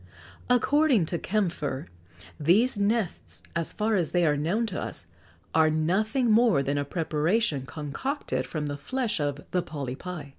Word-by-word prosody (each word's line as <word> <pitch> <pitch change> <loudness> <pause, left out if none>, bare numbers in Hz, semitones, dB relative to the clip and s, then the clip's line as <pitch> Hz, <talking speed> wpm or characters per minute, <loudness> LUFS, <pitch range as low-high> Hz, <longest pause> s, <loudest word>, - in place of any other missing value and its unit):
According 255 - +4
to 170 - -2
Kœmpfer, 170 - -1 0.5
these 205 - +4
nests, 205 -1 -1
so 170 - +1
far 220 +5 -1
as 175 -6 +1
they 175 -1 +2
are 150 -2 +3
known 175 +11 0
to 195 -4 -4
us, - - -6 0.5
are 160 -1 +5
nothing 215 - +1
more 220 - +4
than 140 +1 0
a - - 0
preparation 155 - 0
concocted 150 - -3
from 155 -2 -3
the 145 -1 -3
flesh 240 - -2
of 145 -1 -2
the 180 - +2
polypi. 145 +1 -6
175 Hz, 150 wpm, -27 LUFS, 145-220 Hz, 0.5 s, are